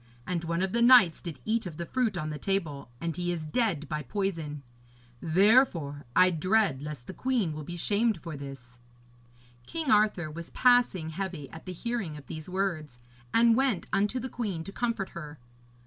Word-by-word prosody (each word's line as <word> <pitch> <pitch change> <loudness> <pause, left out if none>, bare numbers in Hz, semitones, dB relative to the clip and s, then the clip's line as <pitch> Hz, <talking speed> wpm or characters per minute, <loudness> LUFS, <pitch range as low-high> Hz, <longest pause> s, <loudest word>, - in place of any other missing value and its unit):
And 175 -2 -2
one 170 +2 0
of 190 - -1
the 235 - +1
knights 235 -9 +7
did 170 -4 -7
eat 225 -1 0
of 160 -4 -8
the 170 - -4
fruit 230 -2 0
on 155 -2 -3
the 150 - -5
table, 160 -10 -2
and 165 -2 -3
he 175 +1 -1
is 165 -3 -3
dead 165 - 0
by 150 -1 -3
poison. 155 - -3 0.6
Therefore, 170 - +3
I 185 0 +6
dread 185 -3 +2
lest 150 -4 -7
the - - -7
queen 240 -11 0
will 155 0 -6
be 175 +4 -7
shamed 210 +3 +1
for 165 -1 -7
this.' 135 -3 -10 0.9
King 320 -4 -2
Arthur 210 -8 +3
was 170 +2 -7
passing 245 -10 +3
heavy 175 -5 -5
at 160 +3 -11
the - - -3
hearing 195 -4 -3
of 145 - -12
these 155 +4 -7
words, 175 -8 -2 0.3
and 230 0 +5
went 255 -8 +1
unto 210 +6 +1
the 255 - -4
queen 210 -9 -3
to 195 - -8
comfort 230 -4 -2
her. 150 -3 -8
175 Hz, 185 wpm, -29 LUFS, 155-215 Hz, 0.9 s, knights